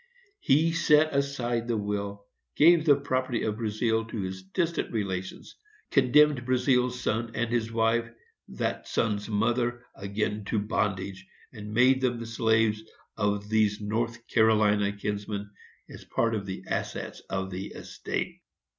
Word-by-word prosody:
He 155 +5 +3
set 155 -2 +4
aside 120 -4 -1
the 115 -2 0
will, 100 -1 -3 0.3
gave 165 +1 +6
the 145 - +7
property 130 -3 -1
of 105 -1 -1
Brazealle 110 0 0
to 110 - -5
his 95 0 -5
distant 165 - -2
relations, 95 -4 -4 0.4
condemned 140 0 +4
Brazealle's 125 0 +1
son, 115 +2 -1
and 120 0 -1
his 115 -2 0
wife, 115 +1 +1 0.4
that - - -3
son's 105 -2 -1
mother, 120 +3 0
again 105 +1 -3
to 110 - -1
bondage, 95 -3 -2 0.3
and 105 -2 -8
made 130 +4 +4
them 125 -2 +1
the 115 - -5
slaves 110 -1 +2 0.3
of 105 -1 -1
these 105 -1 +2
North 115 +2 -3
Carolina 105 -3 +3
kinsmen, 100 0 -4 0.4
as - - -11
part 115 -1 0
of 100 -3 -3
the 95 -1 -5
assets - - -4
of 95 0 -3
the 95 +1 -5
estate. - - -5
110 Hz, 140 wpm, -28 LUFS, 105-125 Hz, 0.4 s, the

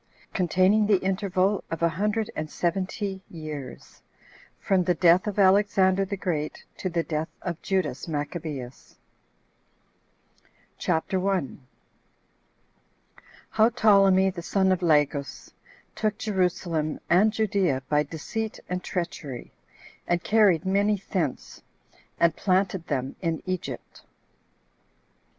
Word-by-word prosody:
Containing 185 +3 +3
The 205 -2 +5
Interval 190 +1 0
Of 165 0 -4
A 170 - +4
Hundred 210 +6 -1
And 155 0 -4
Seventy 190 +3 -2
Years.From 155 +4 -5
The 180 - +2
Death 175 +3 +4
Of 210 - -3
Alexander 195 -1 +4
The 200 +1 -4
Great 155 -5 -3
To 185 - -3
The 170 -1 -1
Death 155 0 -3
Of 175 -2 -4
Judas 185 -9 -1
Maccabeus. 145 -4 -5 1.8
CHAPTER 180 +2 0
1. 180 -9 -2 1.8
How 220 +1 +4
Ptolemy 195 -5 +4
The 180 -2 -7
Son 190 +2 +1
Of 185 -1 +1
Lagus 150 -4 0 0.4
Took 215 -1 -1
Jerusalem 180 -7 -1
And 195 +6 +4
Judea 195 - 0
By 150 +1 +3
Deceit 215 +9 -5
And 180 0 -3
Treachery, 165 -8 -5 0.6
And 175 0 0
Carried 200 -6 +4
Many 200 +2 +2
Thence, 160 -8 -3 0.6
And 170 -1 +3
Planted 190 -2 0
Them 130 +1 -2
In 165 -3 -2
Egypt. 185 -1 -5
185 Hz, 110 wpm, -26 LUFS, 160-195 Hz, 1.8 s, The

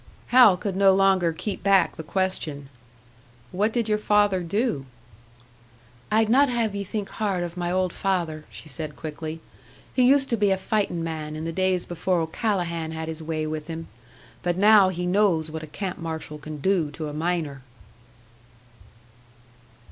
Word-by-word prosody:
Hal 240 -7 +7
could 195 0 -3
no 195 0 +5
longer 190 -3 +3
keep 195 +5 -5
back 195 -3 +3
the - - -6
question, 155 -5 -2 0.8
"What 205 +4 +1
did 235 -1 -1
your 210 -1 +1
father 205 -3 +3
do?" 175 - -1 1.2
"I'd 220 +1 +3
not 270 +5 +4
have 230 -4 0
ye 200 0 -3
think 205 +1 -4
hard 195 -5 -1
of 170 0 -6
my 175 -1 -2
old 185 0 0
father," 170 -5 -2
she - - -11
said, 155 +1 -5
quickly. 160 +1 -6 0.5
"He 255 - +2
used 270 +2 +5
to 235 - +1
be 205 -1 +3
a 190 - +2
fightin' 190 -4 -1
man, 155 -2 -4
in 155 +1 -5
the 165 - -3
days 185 0 +1
before 175 +1 -1
O'Callahan 170 -1 -1
had 160 0 -5
his 160 0 -6
way 155 -1 -2
with 155 0 -4
him. 165 -1 -6 0.5
But 175 0 -1
now 205 -1 +6
he 180 -1 -3
knows 180 -4 +2
what 160 0 -5
a 155 - -8
camp 180 +5 -5
marshal 160 -2 -5
can 155 +1 -7
do 180 -3 +1
to 155 +1 -5
a 150 - -6
miner!" 155 -3 -2
180 Hz, 170 wpm, -25 LUFS, 160-200 Hz, 1.2 s, Hal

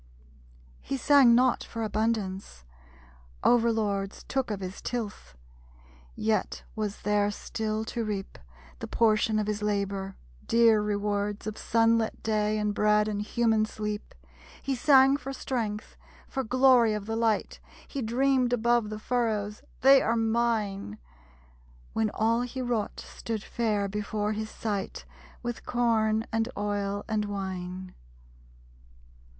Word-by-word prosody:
He 275 - -3
sang 265 -2 +6
not 250 0 +3
for 230 -1 -5
abundance. 205 - -2 0.8
Over 235 -1 +4
lords 200 -3 -2
Took 265 -3 -2
of 210 -2 -3
his 185 0 -6
tilth. 220 - -5 0.8
Yet 220 -1 -1
was 210 -2 -4
there 205 0 +2
still 215 +1 -3
to 230 +1 -3
reap, 205 -3 -4 0.4
The - - -5
portion 215 -1 +2
of 215 - +1
his 210 0 -2
labor; 200 -2 -2 0.3
dear 230 -2 +5
rewards 205 0 -1
Of 215 -1 -4
sunlit 230 0 +1
day, 215 -1 +1
and 210 -1 0
bread, 210 0 +3
and 205 -1 -2
human 220 0 +2
sleep. 210 -1 -5 0.5
He 275 - -1
sang 270 +1 +5
for 270 -2 -6
strength; 225 -6 -3 0.3
for 265 - -3
glory 250 -2 +5
of 210 -1 -5
the 225 +1 -3
light. 225 -2 0 0.3
He 275 - -4
dreamed 250 +2 +2
above 235 -2 +2
the 215 - -5
furrows, 215 -3 -1 0.2
'They 270 +2 +7
are 230 +1 +1
mine!' 220 - 0 1.0
When 110 +5 +1
all 230 +2 +2
he 245 +1 -5
wrought 240 -4 -2
stood 220 -2 -5
fair 210 -4 -1
before 210 +1 -2
his 215 +1 -4
sight 205 -4 -4 0.4
With 240 -1 -4
corn, 225 -2 +1
and 225 +1 +1
oil, 205 0 -2
and 215 -2 0
wine. 185 -2 -5
215 Hz, 130 wpm, -28 LUFS, 205-235 Hz, 1.0 s, They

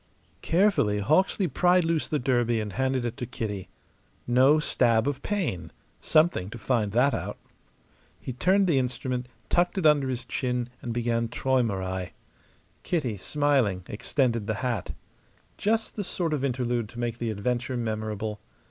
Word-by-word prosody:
Carefully 170 - +2
Hawksley 180 - +2
pried 180 0 +3
loose 165 -1 0
his 150 - 0
derby 120 -3 +2
and 105 -2 -4
handed 130 +2 0
it 120 0 -3
to 125 - -4
Kitty. 105 -6 -5 0.6
No 130 +5 +5
stab 120 -6 +2
of 140 -1 -2
pain; 150 - -2 0.3
something 155 - +2
to 120 - -8
find 110 -3 0
that 130 +4 +4
out. - - -4 0.8
He 130 - -6
turned 190 +10 +3
the 160 -7 +3
instrument, 125 0 -2 0.2
tucked 175 +3 +1
it 185 - 0
under 145 -3 +4
his 125 -1 -3
chin 125 -1 -2
and 120 - -4
began 115 0 0
"Traumerei." 100 -8 -1 0.7
Kitty, 140 - -1
smiling, 130 -6 +1
extended 115 0 0
the 110 - 0
hat. 115 -7 -2 0.6
Just 220 +2 0
the 205 - -2
sort 175 -3 -2
of 140 -3 -1
interlude 120 -4 -1
to 120 0 -10
make 120 -1 -2
the 115 - -1
adventure 120 +4 -2
memorable. 110 -2 -3
125 Hz, 150 wpm, -27 LUFS, 110-150 Hz, 0.8 s, No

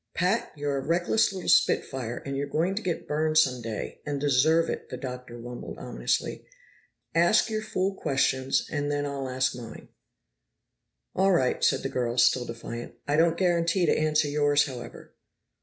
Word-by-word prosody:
"Pat, 185 +6 0
you're 145 -1 -2
a - - -1
reckless 175 +8 +2
little 190 -2 -6
spit - - +4
fire, 125 -3 -5
and 140 0 -3
you're 140 +1 -2
going 170 +6 0
to 205 - -3
get 180 -5 -3
burned 155 +1 0
some 130 -5 +3
day, 110 -2 -6
and 145 -1 -3
deserve 145 +4 +3
it," - - -5
the - - -5
Doctor 125 -2 -7
rumbled 120 +1 -8
ominously. - - -2 0.7
"Ask 175 +7 +3
your 215 0 -1
fool 195 -2 -1
questions, 135 -5 0
and 145 -1 -1
then 145 0 -1
I'll 140 -2 -4
ask 130 0 0
mine." 120 -2 -10 1.2
"All 195 +1 +3
right," 130 -7 +1
said - - +3
the - - 0
girl, 120 -2 -2
still 120 +1 +4
defiant. 115 0 -7
"I 145 - +1
don't 165 +1 +3
guarantee 175 0 +2
to - - +3
answer 155 -1 +2
yours, 145 0 +3
however." 125 -5 -9
145 Hz, 175 wpm, -27 LUFS, 130-170 Hz, 1.2 s, spit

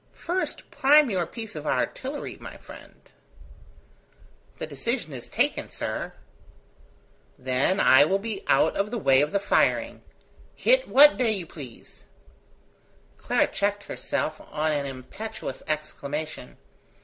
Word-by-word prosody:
First 360 +2 -4
prime 290 -1 +5
your 180 -4 0
piece 225 0 -7
of 150 0 -6
artillery, 275 +3 -2
my - - -10
friend." - - -14 1.6
"The - - -4
decision 235 - -3
is 125 -3 -8
taken, - - 0
sir." - - -4 1.2
"Then 130 +9 +1
I 130 +2 +7
will 190 +5 +2
be 205 0 -5
out - - +3
of 200 +1 0
the 240 - -3
way 135 -9 +4
of 150 +1 0
the 200 - +1
firing. 200 - +1 0.5
Hit - - +3
what 295 +2 +7
day 235 -4 +2
you 190 -4 -4
please." 140 -8 -12 1.1
Clara - - +2
checked 205 +1 -1
herself 155 -5 -3
on 155 +1 0
an 145 -2 -1
impetuous 135 - -7
exclamation. 155 0 -4
190 Hz, 125 wpm, -26 LUFS, 145-230 Hz, 1.6 s, I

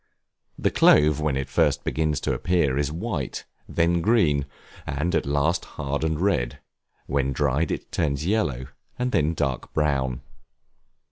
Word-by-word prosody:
The - - +1
clove 75 0 +5
when 75 -3 0
it 65 - -3
first - - +1
begins 75 -2 0
to - - 0
appear 85 -7 +1
is 70 +1 0
white, 80 - -4 0.2
then 85 0 +2
green, 80 -9 +2 0.4
and 75 +5 -1
at - - 0
last 70 +4 +1
hard 70 +1 -2
and 80 -1 0
red; 70 -9 0 0.5
when 70 0 0
dried, 75 +3 +1
it - - -4
turns 75 -2 -1
yellow, 85 - 0 0.3
and 125 0 -1
then 80 -3 +1
dark 70 -5 -2
brown. 65 -5 0
75 Hz, 145 wpm, -25 LUFS, 70-85 Hz, 0.5 s, clove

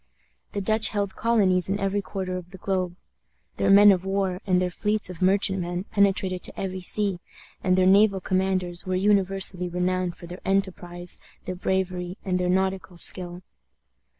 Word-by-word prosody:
The 200 - -2
Dutch 220 +3 +3
held 200 -2 -2
colonies 195 -6 +2
in 195 - 0
every 195 +1 0
quarter 190 -2 -4
of 180 -1 -7
the 190 - -11
globe. 185 -2 -2 0.6
Their - - +1
men 205 +1 +8
of 185 -2 +1
war 195 -1 -1
and 180 -1 +3
their 180 0 -1
fleets 210 0 -1
of 180 - -11
merchantmen 185 -2 +1
penetrated 195 -2 +1
to - - -6
every 190 -1 -4
sea, 195 0 +2 0.4
and 185 -1 +3
their 185 - +4
naval 195 +1 +5
commanders 185 -2 -1
were 185 0 -2
universally 195 -2 +1
renowned 180 0 -1
for - - -11
their 175 +2 -9
enterprise, 180 -2 -2 0.3
their 185 - -3
bravery, 185 0 -2
and 180 -1 0
their 180 0 0
nautical 190 -1 -1
skill. 175 +1 0
185 Hz, 165 wpm, -25 LUFS, 180-195 Hz, 0.6 s, men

